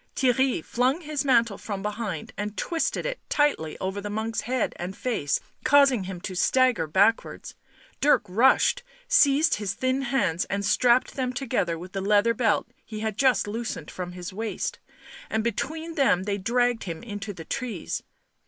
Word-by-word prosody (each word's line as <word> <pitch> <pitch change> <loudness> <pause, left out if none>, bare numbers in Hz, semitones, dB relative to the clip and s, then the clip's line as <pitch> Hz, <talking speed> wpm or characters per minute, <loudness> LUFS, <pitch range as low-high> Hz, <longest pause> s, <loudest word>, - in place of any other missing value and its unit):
Theirry 260 -7 +2
flung 255 +7 +1
his 300 -3 -2
mantle 235 -6 +2
from 200 -3 -5
behind 210 -5 -4
and 210 +1 -5
twisted 330 -2 -1
it - - -3
tightly 290 - +1
over 190 +2 -3
the 205 - -5
monk's 220 +2 -2
head 250 0 -1
and 180 +2 -6
face, 220 - -1 0.2
causing 270 -7 +4
him 185 -1 -6
to 190 - -5
stagger 245 -2 +2
backwards; 200 +8 +1 0.5
Dirk 295 - +4
rushed, 230 +9 +4 0.3
seized 305 - +4
his 205 -1 -3
thin 260 +1 0
hands, 240 -10 0
and 200 0 -2
strapped 245 +4 +3
them 255 -2 -2
together 230 -10 -1
with 180 +3 -9
the 195 - -3
leather 210 +3 +3
belt 225 -3 +1 0.2
he 215 -1 -7
had 220 -2 -2
just 255 -4 +3
loosened 225 +3 -4
from 180 -1 -6
his 180 +1 -7
waist, 220 +2 -3 0.5
and 220 0 0
between 315 +9 -3
them 265 - +2
they 200 0 -2
dragged 240 +3 +1
him 165 -3 -6
into 205 -2 -5
the 165 -4 -9
trees. 245 -10 -4
225 Hz, 165 wpm, -26 LUFS, 195-260 Hz, 0.5 s, causing